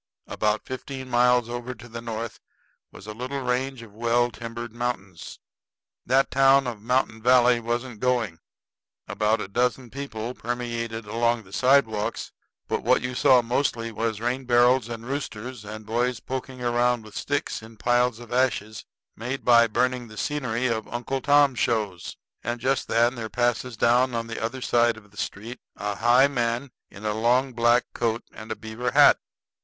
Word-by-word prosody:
About 105 0 -1
fifteen 130 0 -7
miles 125 0 +4
over 120 +1 -5
to 120 +2 -13
the 115 0 -7
north 115 -1 -5 0.5
was - - -13
a 105 - -6
little 130 +5 -4
range 125 0 -2
of 110 -3 -14
well 120 +2 +1
timbered 115 +1 -7
mountains. 100 -8 -5 0.7
That 135 +2 +3
town 135 0 +5
of 115 -4 -5
Mountain 120 -1 0
Valley 125 0 +5
wasn't 120 0 -3
going. 120 -9 0 0.7
About 110 +1 +1
a - - -4
dozen 125 +3 -1
people 125 -4 -5
permeated 115 -2 -4
along 115 +2 0
the 95 0 -17
sidewalks; 125 -5 +2 0.4
but - - -1
what - - +3
you 125 0 -3
saw 125 0 +5
mostly 115 -1 -1
was 110 -1 -2
rain 125 +3 -2
barrels 120 0 +4
and 115 -1 -6
roosters, 125 -3 -5
and 110 +1 -8
boys 120 +2 0
poking 130 -1 -6
around 120 -1 +1
with 110 - -13
sticks 145 -4 -2
in 110 0 -13
piles 120 0 +2
of 120 -1 -9
ashes 110 -5 0 0.3
made 125 +4 -5
by 115 -1 +6
burning 125 +2 0
the 110 -1 -13
scenery 130 -4 -2
of 115 -3 -1
Uncle 120 +3 -3
Tom 145 -1 +5
shows. 105 -6 -2 0.3
And 120 0 -3
just 130 +1 0
then 120 +2 +3
there 115 -3 -6
passes 120 +1 -1
down 120 +2 +3
on 115 0 -2
the 115 -1 -5
other 125 +3 -3
side 120 -2 +2
of 105 -2 -16
the 105 - -20
street 115 +7 -5 0.2
a 105 0 -3
high 120 +6 +5
man 120 0 -2 0.2
in 105 +2 -11
a 105 - 0
long 125 +4 +2
black 120 +1 +4
coat 115 -1 -1
and 110 +1 -10
a - - -1
beaver 110 +3 -4
hat. - - +7
120 Hz, 170 wpm, -25 LUFS, 110-125 Hz, 0.7 s, hat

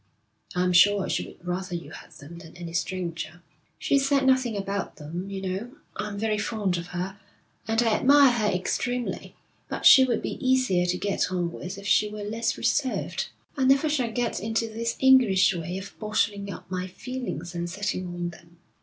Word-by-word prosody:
'I'm 180 0 +2
sure 200 +2 +5
she - - -1
would - - -15
rather 180 0 -3
you 170 - -7
had - - -11
them 170 +4 -11
than 165 0 -13
any 170 -1 -7
stranger.' 175 -1 -3 0.3
'She's 275 -1 +1
said 275 -2 +3
nothing 260 -4 +2
about 200 0 -3
them. 170 +6 -6
You 195 -1 -5
know, 190 +6 -3 0.2
I'm 210 -1 -4
very 215 0 0
fond 210 -5 -1
of 170 0 -6
her, 180 +3 -5 0.5
and 225 +1 +2
I 225 -2 +2
admire 280 0 +6
her 225 -3 0
extremely, 245 +6 -2 0.3
but - - -4
she 265 - +10
would 245 -3 0
be - - -5
easier 255 -9 +2
to 180 0 0
get 200 -1 -1
on 175 -2 -1
with 180 +3 -7
if 200 - -10
she 210 0 +3
were 210 0 -6
less 225 +2 -2
reserved. 265 -3 -1 0.3
I 275 - 0
never 275 +3 +4
shall 260 -6 0
get 240 +1 -1
into 225 +2 -1
this 230 +1 -2
English 245 -9 +5
way 175 +1 -4
of 195 +1 -8
bottling 205 -2 -1
up 185 - -10
my 185 0 -2
feelings 190 - -6
and 175 0 -3
sitting 185 0 -3
on 175 0 -4
them.' 170 0 -18
200 Hz, 190 wpm, -26 LUFS, 180-235 Hz, 0.5 s, she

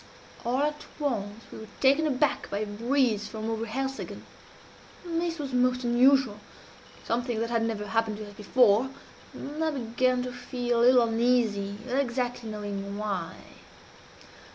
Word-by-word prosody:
All 250 +3 +1
at 300 0 -2
once 225 -7 -2
we - - -8
were 220 - -9
taken 280 +4 +4
aback 290 0 +1
by 200 - -2
a 215 - -1
breeze 230 +1 +1
from 220 0 -4
over 225 +1 -2
Helseggen. 270 +4 -4 0.8
This 335 0 -1
was 280 -4 -5
most 250 0 +2
unusual 245 -2 +4 0.7
something 240 -1 -1
that 230 +1 -2
had 230 -1 +2
never 225 -2 -2
happened 220 0 0
to 215 -1 -7
us 205 - -11
before 220 +3 +3 0.4
and 300 +3 -5
I 320 - +2
began 255 -2 0
to 250 0 -5
feel 245 -1 -2
a - - +3
little 250 -1 +7
uneasy, 225 -4 +1
without 255 +1 0
exactly 245 -2 -2
knowing 200 -1 -5
why. 195 -6 -3
240 Hz, 155 wpm, -28 LUFS, 215-260 Hz, 0.8 s, little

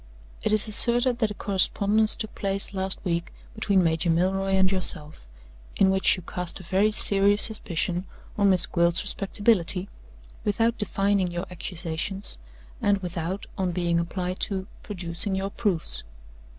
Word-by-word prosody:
It - - -1
is 215 +1 +3
asserted 240 +3 +2
that 220 -3 +1
a 210 - -7
correspondence 205 +2 +2
took 220 -1 -6
place 195 0 -1
last 190 0 +2
week 170 -1 -2 0.2
between 200 -4 +1
Major 165 +1 0
Milroy 190 +3 +1
and 190 0 +3
yourself; 155 - -2 0.5
in 190 -1 +3
which 190 0 +3
you 185 - -10
cast 180 +1 -4
a - - -11
very 195 +4 +1
serious 205 0 +4
suspicion 180 -4 -1 0.3
on 200 -1 +3
Miss 185 -2 +5
Gwilt's 170 -1 +1
respectability, 195 -2 +2 0.5
without 225 +3 0
defining 200 -2 0
your 175 +2 -4
accusations 180 - -4 0.4
and 205 0 +2
without 175 +2 -4
(on 185 -2 -1
being 170 -1 0
applied 180 +2 -4
to) 190 -2 -1 0.2
producing 185 0 -2
your 195 +1 -3
proofs. 195 -8 -2
190 Hz, 145 wpm, -25 LUFS, 175-205 Hz, 0.5 s, Miss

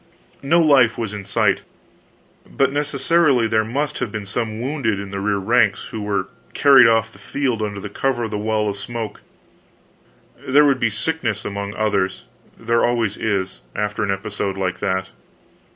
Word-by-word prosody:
No 165 +5 +3
life 135 -8 +4
was 110 -3 -3
in 100 -2 -6
sight, 105 -1 +1 0.9
but 135 -1 +1
necessarily 145 -2 +2
there 110 -1 +2
must 140 +6 -2
have 110 - -3
been 105 -2 -5
some 110 +2 -3
wounded 125 -5 -1
in 100 -1 -7
the 100 - -4
rear 100 0 0
ranks, 110 +1 +1
who 110 - -5
were 105 -1 -1 0.3
carried 135 -4 +7
off 115 -1 +2
the - - -17
field 130 -6 -2
under 105 -1 -4
cover 120 +4 -1
of 110 - -4
the 105 - -2
wall 110 0 0
of 100 -1 -3
smoke; 115 +1 -6 1.2
there 145 +3 +4
would 135 -3 +3
be 120 - +2
sickness 115 -2 -2
among 100 0 -4
the - - -10
others 100 -3 0 0.3
there 115 +1 +1
always 115 -4 +1
is, 95 - -2
after 105 +1 -2
an 100 - -2
episode 100 0 -3
like 90 -1 -2
that. 95 0 -1
110 Hz, 170 wpm, -21 LUFS, 100-125 Hz, 1.2 s, carried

